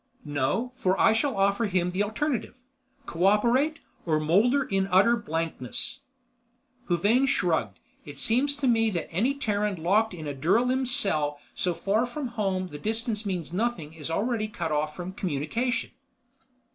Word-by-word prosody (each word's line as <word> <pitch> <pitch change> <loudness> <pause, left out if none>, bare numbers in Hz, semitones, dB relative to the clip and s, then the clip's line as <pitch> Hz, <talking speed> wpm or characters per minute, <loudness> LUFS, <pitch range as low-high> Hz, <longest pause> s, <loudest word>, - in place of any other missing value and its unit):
"No, 145 - -1
for 190 -7 0
I 220 - +5
shall 225 0 0
offer 200 +3 +2
him 180 -2 0
the 185 +3 -1
alternative. 235 +4 -2 0.5
Co 170 +2 -1
operate, 240 +10 +3 0.3
or 155 -3 +1
molder 210 - +3
in 195 -5 0
utter 195 +6 +5
blankness." 165 - -4 0.9
Huvane 210 +10 +3
shrugged. 160 - 0 0.4
"Seems 255 - +1
to 280 -2 -1
me 225 -2 +3
that 175 -6 -4
any 240 +11 +1
Terran 210 -8 -1
locked 205 +3 +2
in 155 -3 -7
a 145 - -3
duralim 245 - +1
cell 155 - +1 0.2
so 180 -2 -1
far 215 +7 +1
from 260 +1 -4
home 195 -5 -2
the 145 - -8
distance 225 - -2
means 175 -4 -3
nothing 185 -7 -2
is 160 -1 -5
already 215 +5 0
cut 160 -7 -1
from 175 +4 -7
communication." 195 - -2
205 Hz, 145 wpm, -27 LUFS, 170-235 Hz, 0.9 s, I